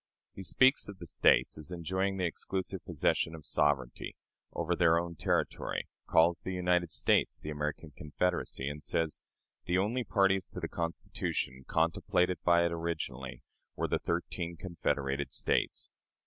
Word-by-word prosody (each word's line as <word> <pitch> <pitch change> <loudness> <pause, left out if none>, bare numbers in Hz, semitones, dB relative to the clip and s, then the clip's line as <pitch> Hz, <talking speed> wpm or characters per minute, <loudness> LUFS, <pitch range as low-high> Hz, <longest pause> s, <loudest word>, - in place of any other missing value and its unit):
He - - -8
speaks 130 - +4
of 100 - -8
the 85 - -9
States 80 - +3
as 75 +3 -4
enjoying 95 +3 -1
"the 90 - 0
exclusive 95 +2 -3
possession 80 -1 0
of 80 -3 -11
sovereignty" 65 -4 0 0.4
over 85 +1 -1
their 85 -1 +4
own 85 0 -2
territory, 80 - -1 0.2
calls 85 +1 +4
the 95 - -4
United 90 -2 +1
States - - +3
"the 75 - -6
American 75 +1 -4
Confederacy," 75 -2 -1
and 75 +1 -4
says, 80 0 0 0.4
"The 90 - +1
only 110 +7 +1
parties 95 -4 +2
to - - -5
the - - -3
Constitution, 75 -6 -3
contemplated 85 +2 +1
by 85 0 +5
it 85 - 0
originally, 80 -6 -4 0.3
were - - -1
the - - 0
thirteen 85 0 -3
confederated 70 -5 -2
States." - - 0
85 Hz, 150 wpm, -31 LUFS, 75-90 Hz, 0.4 s, by